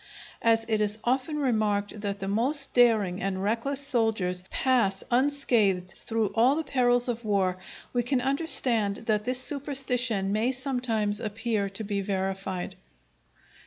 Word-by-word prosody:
As 225 0 +3
it 220 -2 +1
is 210 0 0
often 260 +5 0
remarked 215 -6 0
that 200 -1 -3
the 195 - -4
most 265 +8 0
daring 220 -6 +3
and 190 -1 -2
reckless 230 +7 -1
soldiers 220 -9 0
pass 230 -7 +1
unscathed 240 -9 +2
through 225 -3 -2
all 245 +6 +4
the 320 - -1
perils 245 -3 +2
of 240 -1 -3
war, 190 -4 0 0.3
we 245 - +2
can 250 +2 0
understand 250 -7 +1
that 210 -2 0
this 255 0 0
superstition 255 -7 0
may 225 +5 +1
sometimes 245 -6 -1
appear 215 -2 -2
to 195 +3 -5
be 200 -1 -2
verified. 190 -1 -3
225 Hz, 140 wpm, -27 LUFS, 200-255 Hz, 0.3 s, all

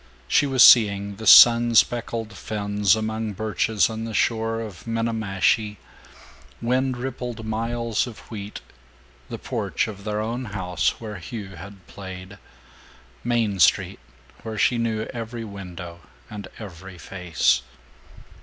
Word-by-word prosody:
She 145 - +3
was 130 -2 +5
seeing 100 -3 +6
the 110 - -6
sun 120 0 +8
speckled 115 -1 +1
ferns 100 -1 0
among 110 0 -3
birches 110 +1 0
on 110 0 -5
the 115 -1 -5
shore 115 -1 0
of 110 -2 -8
Minniemashie, 110 -2 0 0.8
wind 130 +2 0
rippled 120 -3 -5
miles 115 +1 -2
of 115 - -9
wheat, 105 -1 -7 0.7
the - - -5
porch - - -2
of 100 -2 -9
their 105 0 -2
own 115 +4 -3
house 90 -5 -2
where 105 -2 -7
Hugh 105 +1 -7
had 95 +1 -12
played, 95 +1 -10 0.8
Main 115 -5 0
Street - - +3 0.4
where 110 -1 -6
she 120 +3 +2
knew 110 -2 -1
every 115 0 -6
window 90 -4 -9 0.3
and 105 -2 -7
every 95 -3 -10
face. 90 -6 0
110 Hz, 125 wpm, -23 LUFS, 100-115 Hz, 0.8 s, sun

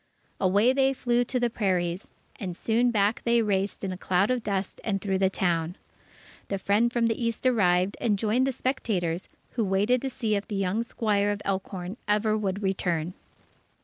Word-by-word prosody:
Away 205 +7 +4
they 270 0 +3
flew 245 -2 +1
to 250 +1 -1
the 240 -1 +1
prairies, 185 -4 -1 0.3
and 180 -3 -4
soon 235 +2 +2
back 210 -1 +1
they 235 -1 +3
raced 200 -1 -1
in 195 - -2
a 185 - -5
cloud 190 +6 +2
of 250 -1 0
dust 200 -3 -3
and 195 -3 0
through 190 -1 -1
the 190 -1 +3
town. 175 -2 0 0.7
The 195 - -2
friend 205 +5 +2
from 235 -1 +1
the 230 +1 0
East 230 +2 -2
arrived, 190 -6 +3
and 210 -4 +2
joined 225 +5 +1
the - - +1
spectators, 195 -10 -2 0.2
who 235 - -1
waited 205 +6 +2
to 270 - -2
see 225 -4 -2
if 200 0 -1
the 215 - -4
young 195 +3 0
squire 210 -3 0
of 205 0 -2
Elkhorn 190 0 -3
ever 210 +1 +2
would 200 -1 -2
return. 180 -3 -1
205 Hz, 185 wpm, -27 LUFS, 190-235 Hz, 0.7 s, Away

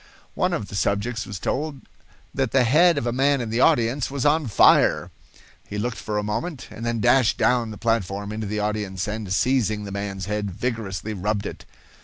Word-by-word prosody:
One - - 0
of 100 - -2
the - - -12
subjects 100 +3 -1
was 100 - -5
told 140 - -3 0.5
that 135 -2 0
the 130 +1 +3
head 160 +7 +5
of 140 - -1
a 120 - 0
man 135 +3 +2
in 115 -3 -4
the 115 - 0
audience 130 -3 +3
was 140 -1 -3
on 150 -1 +3
fire. 105 - +4 0.6
He 105 - -5
looked 120 +3 -2
for 105 -1 -3
a 105 - 0
moment, 120 +8 -4
and 115 - -8
then 115 -1 -1
dashed 120 0 +4
down 120 -2 +2
the 105 - -8
platform 100 -3 -1
into 110 0 -4
the 105 +1 -2
audience, 105 -2 -2
and, 105 -2 -4
seizing 110 -1 +1
the 100 - -7
man's 100 -1 -4
head, 105 0 -2
vigorously 110 0 -4
rubbed 105 +1 -2
it. - - -7
110 Hz, 200 wpm, -23 LUFS, 105-125 Hz, 0.6 s, head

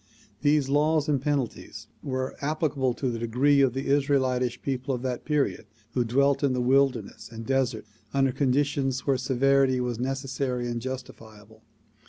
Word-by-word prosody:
These 145 -2 +3
laws 150 +2 +2
and 145 -4 +1
penalties 140 -4 -3 0.2
were 130 -1 -3
applicable 140 -4 0
to 130 -2 -1
the 115 - -4
degree 130 +5 +3
of 130 -3 +3
the 135 - -3
Israelitish 130 -3 +1
people 130 0 -2
of 125 - -7
that 125 -2 -3
period 145 -7 0 0.3
who 125 - +2
dwelt 140 +5 +2
in 140 -2 +2
the 125 - -1
wilderness 130 -3 +1
and 115 0 -8
desert 130 -4 0 0.3
under 135 -1 +2
conditions 135 0 0
where 140 - +3
severity 135 0 +2
was 120 -2 -2
necessary 130 -1 -2
and 120 -1 -3
justifiable. 110 -4 -9
130 Hz, 155 wpm, -26 LUFS, 125-140 Hz, 0.3 s, These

